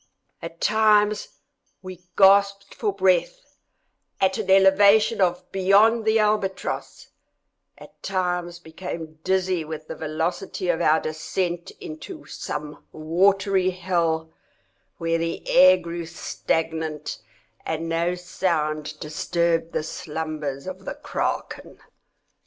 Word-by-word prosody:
At 165 0 -8
times 210 -1 +3 0.6
we 185 -1 -9 0.2
gasped 200 0 +4
for 215 -3 -1
breath 200 - 0 0.6
at 190 +3 +1
an 200 -3 -4
elevation 200 +3 +5 0.3
beyond 205 +4 +4
the 220 0 +3
albatross—at 210 -3 -4
times 180 -2 -2
became 160 -2 -8
dizzy 185 -2 0
with 155 0 -7
the - - -5
velocity 165 +4 -3
of 170 - +1
our 155 +1 +4
descent 170 +2 -3
into 305 - -9
some 150 0 -6
watery 190 +4 +2
hell, 170 -3 -1 0.6
where 165 0 0
the 165 0 -4
air 185 +1 +7
grew 170 -1 -6
stagnant, 160 -2 -3 0.4
and 160 +1 -3
no 170 +2 0
sound 155 -4 -2
disturbed 165 +2 -1
the - - -2
slumbers 155 -3 -5
of 185 0 -7
the - - -5
kraken. - - -4
175 Hz, 105 wpm, -24 LUFS, 160-195 Hz, 0.6 s, air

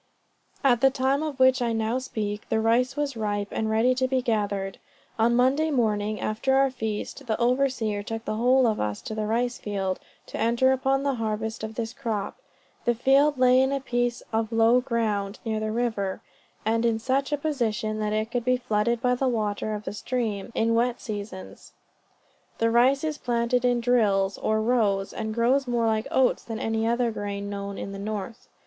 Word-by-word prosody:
At 245 -4 +4
the 270 - +6
time 270 +2 0
of 300 -4 -4
which 260 0 +5
I 235 -1 0
now 225 +3 0
speak, 210 -5 -4
the 220 - +1
rice 240 +4 +2
was 290 -3 -2
ripe, 205 -2 -2
and 220 - -1
ready 225 +4 +3
to 260 0 0
be 260 0 +1
gathered. 205 -5 -1 0.4
On 235 +2 +3
Monday 270 +6 +3
morning, 215 -5 0
after 230 +5 0
our 270 0 +3
feast, 225 +3 -5
the 220 - -1
overseer 245 -4 +1
took 225 +2 -6
the - - -2
whole 250 +4 +3
of 220 -2 +1
us 105 -1 -2
to - - -5
the 215 -1 -2
rice 240 +3 0
field, 195 -3 -2 0.3
to - - -7
enter 235 +4 +3
upon 270 +1 +1
the 280 -1 +1
harvest 220 0 -3
of 220 0 -5
this 230 0 -3
crop. 215 -4 -3 0.5
The 240 - +2
field 275 +4 +3
lay 255 0 +5
in 265 +1 +2
a 275 - 0
piece 245 -2 -1
of 220 0 0
low 230 +2 +4
ground, 215 -5 -1
near 220 -1 -1
the 215 0 -2
river, 220 -5 -2 0.4
and 225 +1 +1
in 230 -1 +2
such 265 +5 -1
a 295 - +1
position 235 -7 -1
that 210 -1 -1
it 215 +1 -1
could 245 -1 -1
be 255 +1 +2
flooded 235 +1 0
by 250 0 +3
the 260 +2 0
water 215 -2 -1
of 210 - -6
the - - -5
stream, 215 -3 -3
in 230 +1 +2
wet 240 +1 +1
seasons. 205 -3 -8 0.8
The 230 0 +2
rice 255 +5 +4
is 310 -2 -2
planted 240 0 0
in 245 -1 +2
drills, 205 -5 +2
or 220 0 0
rows, 210 -5 +1
and 220 -1 -3
grows 250 +4 +2
more 240 -1 +1
like 220 -1 0
oats 260 -1 +2
than 225 -1 -5
any 225 0 -1
of 235 +1 +1
the 250 - +1
other 235 - +1
grain 200 -1 -4
known 200 0 -5
in 195 - -5
the 195 - -7
north. 215 +3 -5
230 Hz, 200 wpm, -26 LUFS, 215-250 Hz, 0.8 s, the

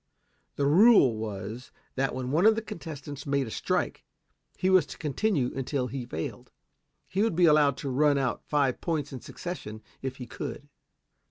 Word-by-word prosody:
The 140 - 0
rule 165 - +6
was 110 +2 -6 0.2
that 135 -1 -1
when 130 0 -3
one 170 +8 +4
of 220 - +6
the 225 - -2
contestants 145 -5 -8
made 140 -1 +1
a 110 - -7
strike, - - -1 0.5
he 185 - 0
was 185 -5 +5
to - - -9
continue 150 - 0
until 135 0 -1
he 125 -1 -5
failed. 100 +10 -5 0.6
He 190 +2 -1
would 220 -5 +1
be 175 +1 +5
allowed 150 -4 +5
to 140 - -4
run 145 +2 +3
out 135 -3 -1
five 140 -4 0
points 150 -5 -2
in 130 - -6
succession 110 -12 -7 0.2
if 130 -1 -4
he 125 - -7
could. 145 +3 -7
140 Hz, 175 wpm, -28 LUFS, 125-160 Hz, 0.6 s, rule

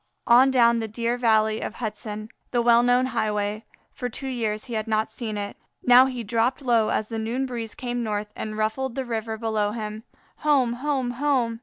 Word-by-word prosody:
On 250 +3 +6
down 235 -3 +4
the 225 - -3
dear 230 +2 -1
valley 220 -3 +2
of 220 - -5
Hudson, 215 -1 -5 0.2
the 240 -1 +1
well 235 0 +6
known 245 +1 +3
highway; 210 -3 -1 0.3
for 245 - -4
two 270 +3 -5
years 220 -4 -2
he 240 - -7
had 215 -1 -2
not 220 0 0
seen 220 -4 -4
it! 205 0 -5 0.3
Now 250 +1 +7
he 250 -3 -4
dropped 235 +5 0
low 230 -4 +3
as 215 - 0
the 225 -1 -3
noon 235 +4 -1
breeze 235 -4 -5
came 245 -3 -3
north 210 -2 -3
and 215 0 -5
ruffled 225 +4 -1
the 265 -1 -2
river 225 -2 -3
below 215 -2 -1
him. 215 -1 -5 0.4
Home! 275 -6 +2
home! 260 -1 -1
home! 245 -3 0
230 Hz, 195 wpm, -25 LUFS, 215-250 Hz, 0.4 s, Now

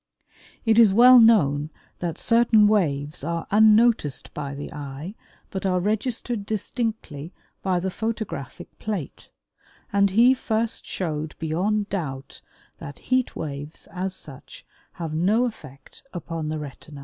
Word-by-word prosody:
It 225 0 +4
is 210 -4 +6
well 250 +2 +9
known 155 -11 +4 0.3
that 170 -2 -3
certain 230 -2 +4
waves 150 -9 0
are 170 +1 -3
unnoticed 215 - +3
by 140 -1 -5
the 145 - -7
eye 145 +5 -7 0.4
but 190 - -4
are 185 -2 +1
registered 220 +3 -2
distinctly 210 - -4 0.3
by 185 -2 0
the 190 +1 -2
photographic 220 - -5
plate, 205 -9 -5 0.6
and 200 0 +4
he 235 +6 +5
first 225 -3 -2
showed 155 -4 -3
beyond 200 +6 -1
doubt 140 -8 -5 0.4
that 140 - -9 0.2
heat 255 -1 +1
waves 145 0 -6
as 190 0 -3
such 140 -7 -11 0.3
have 165 -3 -5
no 200 +10 +2
effect 145 - -10
upon 165 -3 -4
the 155 - -2
retina. 145 0 -9
185 Hz, 130 wpm, -24 LUFS, 150-220 Hz, 0.6 s, well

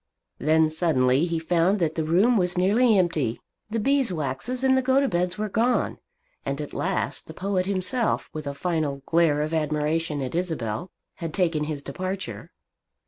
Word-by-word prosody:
Then 155 +2 +3
suddenly 150 -3 +2
he 170 -1 -1
found 170 +4 +2
that 165 -5 0
the 160 - -1
room 190 +10 +3
was 180 -3 +1
nearly 215 +5 +4
empty. 155 -10 0 0.3
The 225 - -2
Beeswaxes 230 - 0
and 265 0 +4
the 260 - +3
Gotobeds 255 -10 +1
were 215 0 -1
gone; 230 +5 0 0.4
and - - -3
at - - -6
last - - -2
the - - -10
poet 190 -1 -1
himself, 200 +5 0
with 155 -2 -6
a 140 - -4
final 150 -4 -2
glare 160 -3 +3
of 155 +2 -4
admiration 155 0 0
at 130 - -5
Isabel, 160 - -2 0.3
had 165 -2 -5
taken 165 -5 +1
his 150 -2 -4
departure. 185 +6 -5
170 Hz, 160 wpm, -25 LUFS, 155-200 Hz, 0.4 s, nearly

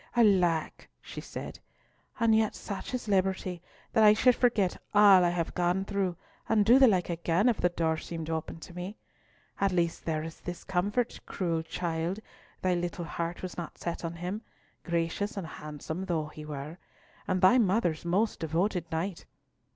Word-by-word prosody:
alack!" 180 -8 +2
she - - -8
said, - - -7 0.6
"and 230 -2 +4
yet 220 -1 +2
such 200 -2 -6
is 250 -3 -4
liberty, 190 -3 0 0.3
that 220 - +5
I 210 0 +8
should 250 +2 +5
forget 220 -7 +1
all 200 -3 +8
I 175 - +4
have 170 -1 -2
gone 180 +2 +1
through, 195 -4 -1 0.3
and 215 -2 +4
do 240 +5 +7
the 265 - +8
like 185 -5 +2
again, 170 +5 +1
if 240 - +2
the 180 - +4
door 165 -2 0
seemed 165 -1 -6
opened 160 0 -4
to 180 - -11
me. 180 +4 -6 0.6
At 195 -1 +2
least 170 -2 0
there 155 -1 -1
is 165 0 -8
this 175 -1 -7
comfort, 205 +6 -1
cruel 170 -3 -1
child, 170 +3 -2 0.4
thy 185 -1 +3
little 175 0 -2
heart 170 +2 -4
was 185 - -6
not 170 - -7
set 170 0 -4
on 165 0 -3
him, 180 +5 -4 0.4
gracious 170 +5 -1
and 190 - -3
handsome 155 +3 -6
though 160 -4 -1
he 155 0 -10
were—and 150 +5 -6
thy 185 +8 +6
mother's 190 -7 +1
most 195 +6 +1
devoted 170 +2 -1
knight! 165 +3 -3
180 Hz, 170 wpm, -29 LUFS, 165-200 Hz, 0.6 s, I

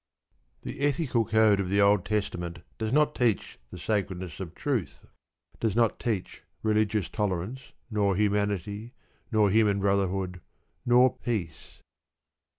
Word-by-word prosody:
The - - -6
ethical 140 -5 +1
code 110 -1 +4
of 95 -2 -1
the 100 +1 +2
Old 100 -2 +4
Testament 85 -5 -3 0.2
does 110 -1 -2
not 150 +2 +3
teach 120 -7 0
the - - -9
sacredness 95 -6 -2
of 90 -3 -7
truth, 130 - -3 0.5
does 110 -3 0
not 115 -2 +2
teach 110 -6 -3 0.2
religious 105 -3 +1
tolerance, 105 +6 -3 0.2
nor 100 -2 +2
humanity, 105 +2 -1 0.4
nor 105 -3 +3
human 105 -2 +3
brotherhood, 95 -2 0 0.5
nor 125 +1 +5
peace. 100 -10 -4
105 Hz, 125 wpm, -28 LUFS, 95-115 Hz, 0.5 s, nor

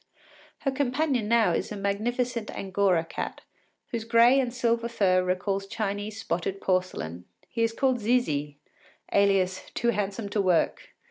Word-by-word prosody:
Her 275 - 0
companion 265 -3 0
now 230 -1 +4
is - - -2
a 210 - -4
magnificent 230 +4 -1
angora 190 -3 +1
cat, - - -5 0.5
whose 230 -2 -3
gray 235 +3 +5
and 250 -3 0
silver 235 -1 0
fur 185 -5 +2
recalls 195 +2 -1
Chinese 205 +1 -3
spotted 190 0 -2
porcelain. 180 - -2 0.2
He 230 - -4
is 230 0 +2
called 260 +1 +1
Zizi, 155 - 0 0.6
alias 195 -2 +2
“Too 235 - +1
Handsome 205 0 -2
to 205 0 +1
Work. 180 -4 0
205 Hz, 140 wpm, -27 LUFS, 190-235 Hz, 0.6 s, gray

